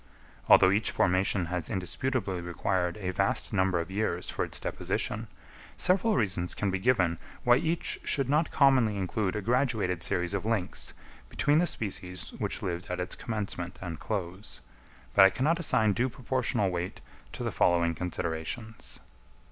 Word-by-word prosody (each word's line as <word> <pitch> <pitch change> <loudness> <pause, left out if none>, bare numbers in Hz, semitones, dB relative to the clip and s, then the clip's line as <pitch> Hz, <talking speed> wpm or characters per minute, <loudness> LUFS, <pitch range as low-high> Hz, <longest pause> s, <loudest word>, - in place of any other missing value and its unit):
Although 95 - +8
each 105 +3 +1
formation 95 +1 +2
has 85 -3 -2
indisputably 95 0 -2
required 90 +1 -1
a 95 -3 -3
vast 95 +4 -1
number 95 -2 +2
of 85 +3 -4
years 95 -3 -1
for - - -1
its - - -4
deposition, - - -2 0.5
several 195 +4 +3
reasons 95 -6 0
can 100 -2 -1
be 95 - -1
given 95 -7 +2 0.2
why 120 0 +6
each 165 +5 -1
should 135 -4 +1
not 150 +4 +2
commonly 130 -7 +4
include 95 +1 -1
a 105 - -3
graduated 115 -7 +1
series 90 0 0
of 100 - -1
links 105 -4 -2 0.4
between 145 +2 +2
the 175 - +2
species 90 - -3
which - - -3
lived 90 +1 -3
at 90 - -3
its 90 - -2
commencement 100 -6 -4
and 85 -4 -6
close, 95 -1 -5 0.5
but 100 - +8
I 95 - +8
cannot 155 - +1
assign 110 -10 +3
due 125 +5 0
proportional 120 -5 -1
weight 90 +1 -4 0.3
to - - -5
the - - -1
following 85 -1 +2
considerations. 90 +6 -5
95 Hz, 155 wpm, -29 LUFS, 90-120 Hz, 0.5 s, Although